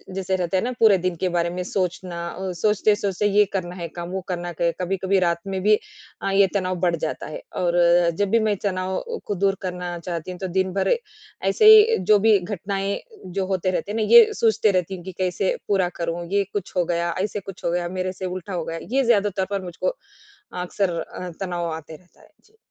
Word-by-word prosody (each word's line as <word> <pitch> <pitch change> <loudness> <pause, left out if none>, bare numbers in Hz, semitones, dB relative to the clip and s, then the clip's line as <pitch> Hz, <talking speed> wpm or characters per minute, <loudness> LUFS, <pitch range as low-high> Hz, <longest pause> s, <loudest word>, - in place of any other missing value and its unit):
जैसे 190 0 -1
रहता 180 0 0
है - - 0
ना 250 - -1
पूरे 215 -4 +6
दिन 180 -1 0
के 185 - +1
बारे 170 0 +1
में 180 +1 -4
सोचना, 180 -1 -3 0.4
सोचते-सोचते 210 -1 +1
ये 205 +1 +4
करना 180 -2 -3
है 170 -2 -5
काम 175 0 -5
वो 190 0 -3
करना 175 0 -3
कभी-कभी 185 +3 0
रात 170 -2 +1
में 190 -1 -2
भी 210 +1 +6 0.5
अ, 195 - -1
ये 195 0 +5
तनाव 185 -2 0
बढ़ 175 -1 +2
जाता 155 - -3
है। 155 - -7 0.2
और 175 -1 +1 0.4
जब 205 -1 +2
भी 230 - +4
मैं 205 - +2
तनाव 185 -1 -1 0.3
को 205 - -2
दूर 195 0 +3
करना 180 -2 -4
चाहती 170 +1 -5
हूँ 180 - -9
तो 190 - -3
दिन 190 0 0
भर 195 - +2 0.5
ऐसे 430 - +2
ही 435 +1 +7
जो 210 - +7
भी 215 0 +5
घटनाएँ 195 +1 -3 0.4
जो 190 0 0
रहते 185 +2 0
हैं - - -3
ना 220 - +1
ये 475 -1 +12
सोचती 220 - +2
रहती 180 +1 -2
हूँ 175 - -10
कि 190 - -6
कैसे 185 0 0
पूरा 190 -3 +2
करूँ? 170 +1 -2
ये 200 0 +3
कुछ 205 -3 -4
हो 175 - +3
गया, 170 0 0
ऐसे 205 0 -2
कुछ 195 -1 -10
हो 170 - +1
गया 175 0 -1
मेरे 185 0 -1
से 185 - -6
उल्टा 185 +1 -5
हो 175 -2 -2
गया। 165 0 -4
ये 270 +1 +3
ज़्यादा 210 -4 +3
तौर 190 - +1
पर 200 -1 -2
मुझको 180 - -2 0.7
अक्सर 180 -1 -1
अ, 180 +2 -6
तनाव 175 -3 -2
आते 160 0 -8
रहता 180 +3 -21
है, - - -20 0.2
जी। 435 +1 -28
185 Hz, 215 wpm, -23 LUFS, 175-200 Hz, 0.7 s, ये